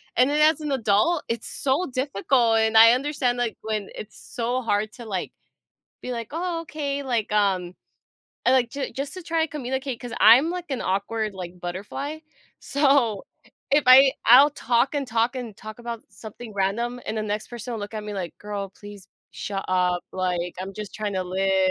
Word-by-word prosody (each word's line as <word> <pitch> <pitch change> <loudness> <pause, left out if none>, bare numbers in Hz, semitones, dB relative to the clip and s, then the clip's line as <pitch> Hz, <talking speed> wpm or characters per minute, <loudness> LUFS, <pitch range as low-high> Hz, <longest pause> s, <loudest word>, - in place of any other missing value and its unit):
And 250 +2 +5
then 300 +1 +1
as 310 +1 +5
an 300 -2 -4
adult, 240 +6 +2
it's 230 -1 -2
so 285 +7 0
difficult, 250 -2 +1
and 220 0 +2
I 225 +1 +9
understand, 255 -2 0
like, 240 -3 -2
when 215 -2 -3
it's 215 - -9
so 245 +2 -3
hard 215 -1 0
to, 240 - -10
like, 195 -4 -3 0.7
be 250 - -5
like, 230 -2 -4
"Oh, 335 +1 -2
okay," 285 -3 -3
like, 235 -5 -1
um 190 -4 +1 0.7
and 255 - +5
like, 250 -2 +3
ju 280 +1 -4
just 275 +1 -4
to 370 - -8
try 330 -1 0
and 320 - -2
communicate, 265 -2 -3
'cause 245 -2 -7
I'm, 265 +8 +7
like, 360 0 -5
an 265 - -2
awkward, 210 +3 -1
like, 180 -1 -8
butterfly, 205 - -5 0.4
so, 270 -7 +2 0.5
if 290 +1 +4
I 265 +1 +8
I'll 265 +6 +8
talk 250 0 +1
and 285 -1 0
talk 230 +2 +1
and 235 -5 -6
talk 215 +1 -10
about 235 -1 -6
something 220 +1 -10
random, 235 +6 -1
and 220 - -3
the 215 - -1
next 210 0 -3
person 240 +1 -7
will 225 - -4
look 205 +2 -7
at 215 -1 -4
me 210 - -5
like, 180 -4 -5
"Girl, 205 -1 -5
please 205 -1 -12 0.2
shut 195 -1 -4
up, 180 -1 +1
like, 180 -2 -2
I'm 190 +1 -5
just 210 -1 -7
trying 210 -2 -3
to 185 -1 -1
li" 190 +1 0
230 Hz, 195 wpm, -24 LUFS, 205-270 Hz, 0.7 s, I